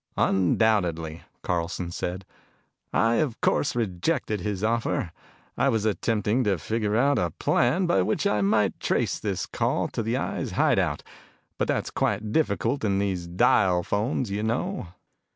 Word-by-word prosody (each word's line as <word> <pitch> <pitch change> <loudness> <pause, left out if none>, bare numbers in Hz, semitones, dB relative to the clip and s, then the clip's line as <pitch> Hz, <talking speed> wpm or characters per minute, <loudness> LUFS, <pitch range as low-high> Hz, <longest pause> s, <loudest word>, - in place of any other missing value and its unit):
"Undoubtedly," 90 -5 +1 0.2
Carlson 85 0 -2
said. 90 +2 -4 0.7
"I, 115 +1 +2
of 135 -7 -1
course, 140 - +1
rejected 110 - -1
his 100 0 -3
offer. 115 -6 0 0.4
I 140 - +2
was 110 -4 0
attempting 110 +3 +1
to 100 -3 +2
figure 105 +5 -1
out 140 +4 +3
a 90 - 0
plan 130 - +1
by 95 - +3
which 105 - 0
I 105 - +2
might 105 0 +2
trace - - 0
this - - -2
call - - -1
to - - -3
the 115 +3 -1
Eye's - - -3
hideout, - - +1 0.6
but - - +1
that's - - -1
quite 105 +1 -1
difficult 125 -1 0
with 100 -3 +1
these 95 -3 -1
dial 90 0 +3
phones, 110 - -1
you 100 +1 -1
know. 120 - -2
105 Hz, 150 wpm, -26 LUFS, 95-115 Hz, 0.7 s, out